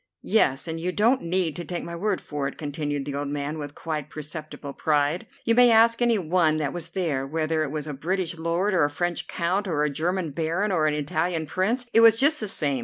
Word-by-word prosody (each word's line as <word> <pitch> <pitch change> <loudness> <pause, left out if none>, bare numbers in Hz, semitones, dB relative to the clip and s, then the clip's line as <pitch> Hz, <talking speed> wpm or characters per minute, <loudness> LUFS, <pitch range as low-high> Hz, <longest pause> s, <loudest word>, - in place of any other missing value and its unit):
"Yes, 160 -9 +2
and 165 0 -4
you 180 +2 -1
don't 230 +7 +2
need 170 -2 0
to 175 - -4
take 175 0 -5
my 170 - -6
word 195 +2 -1
for 145 -2 -3
it," 140 - -7
continued 145 -1 -3
the 145 - -4
old 145 +1 -3
man 145 +2 -3
with 145 -1 -7
quite 155 -3 -4
perceptible 155 -2 -8
pride; 150 +7 0 0.2
"you 230 - +4
may 245 +1 +6
ask 230 +1 +5
any 235 -2 +3
one 165 -3 +2
that 150 -2 -2
was 165 -2 -5
there. 160 -7 -2
Whether 155 +1 -1
it 155 - -1
was 150 0 -4
a 150 - -5
British 170 +4 -2
Lord, 170 +5 0
or 175 -4 +3
a 145 - +2
French 175 +3 -2
Count, 185 +4 -1
or 155 -4 0
a 150 - 0
German 170 +2 -1
Baron, 165 +8 -1
or 160 -4 +2
an 150 - +1
Italian 160 +3 -1
Prince, 220 - -1
it - - +6
was 230 -1 +8
just 290 +5 +4
the 215 - -3
same. 145 -8 0
165 Hz, 235 wpm, -25 LUFS, 150-185 Hz, 0.2 s, was